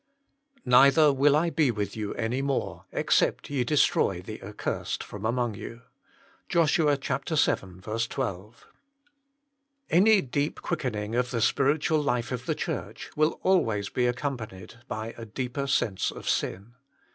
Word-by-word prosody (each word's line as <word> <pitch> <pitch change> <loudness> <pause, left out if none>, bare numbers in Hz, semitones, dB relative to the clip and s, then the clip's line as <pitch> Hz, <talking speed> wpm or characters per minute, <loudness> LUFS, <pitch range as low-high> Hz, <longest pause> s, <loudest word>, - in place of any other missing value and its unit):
"Neither 140 +4 +6
will 140 +2 +4
I 165 +2 +2
be 150 -2 +2
with 105 -4 -2
you 105 -2 -4
any 120 +3 -1
more, 140 -1 -2
except - - +1
ye 135 -3 +1
destroy 145 +4 +2
the - - -8
accursed - - -4
from 105 +1 -8
among 120 -1 0
you." 115 +2 -9 0.7
JOSH, 165 -3 +3
vii 150 -4 +3
12. 115 - -2 1.2
A 170 - +5
NY 215 +1 +6
deep 145 +3 -2
quickening 115 -10 -2
of 125 +1 +1
the 120 - -2
spiritual 145 +6 +2
life 125 -4 -1
of 125 0 -4
the - - 0
Church - - -5
will 155 +1 +1
always 110 - +2
be 125 -1 +1
accompanied 120 -5 -4
by 110 -1 -5
a 115 - -6
deeper 130 +5 -4
sense 100 -8 +1
of - - -9
sin. 100 +6 -2
125 Hz, 140 wpm, -27 LUFS, 110-145 Hz, 1.2 s, Neither